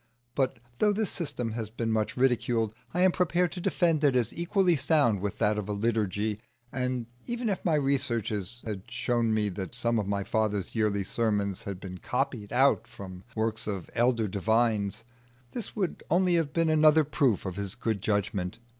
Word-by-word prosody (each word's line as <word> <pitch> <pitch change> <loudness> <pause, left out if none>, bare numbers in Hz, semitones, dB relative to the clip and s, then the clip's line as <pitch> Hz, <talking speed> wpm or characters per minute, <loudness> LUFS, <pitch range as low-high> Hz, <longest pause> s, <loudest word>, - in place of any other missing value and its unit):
But 130 -2 0 0.2
though 210 -1 +4
this 215 -1 -1
system 140 - -3
has 110 -1 -4
been 115 0 -2
much 110 +1 0
ridiculed, 120 -3 +2 0.2
I 180 - 0
am 185 0 +6
prepared 175 -1 +1
to 180 +1 -6
defend 165 -3 +2
it 140 -3 +4
as 120 -3 +2
equally 175 +1 +2
sound 135 - +3
with 100 -1 -3
that 105 -1 +2
of 105 - -5
a - - 0
liturgy; 105 -1 -1 0.3
and 125 -2 -2 0.2
even 240 -1 -2
if 195 - -2
my 165 -3 +2
researches 120 -6 -1
had 105 -2 -5
shown 120 -1 0
me 105 -1 +1
that 95 +4 -5
some 120 -1 +2
of 100 - -2
my 100 -1 -1
father's 105 -2 -1
yearly 105 -3 +1
sermons 100 -2 -1
had 100 -2 -5
been 90 -2 -8
copied 125 -4 -2
out 130 -1 +3
from 100 -6 -9 0.2
the - - -4
works 110 -1 -1
of 100 -5 -4
elder 120 -2 +2
divines, 105 +1 +1 0.5
this 235 - -5
would 195 -5 -2
only 180 +2 +3
have 165 -4 +1
been 165 0 +1
another 155 0 +6
proof 135 - +1
of 95 -2 -3
his 100 -1 -3
good 110 -4 -2
judgment. 100 -3 -1
115 Hz, 185 wpm, -28 LUFS, 105-145 Hz, 0.5 s, am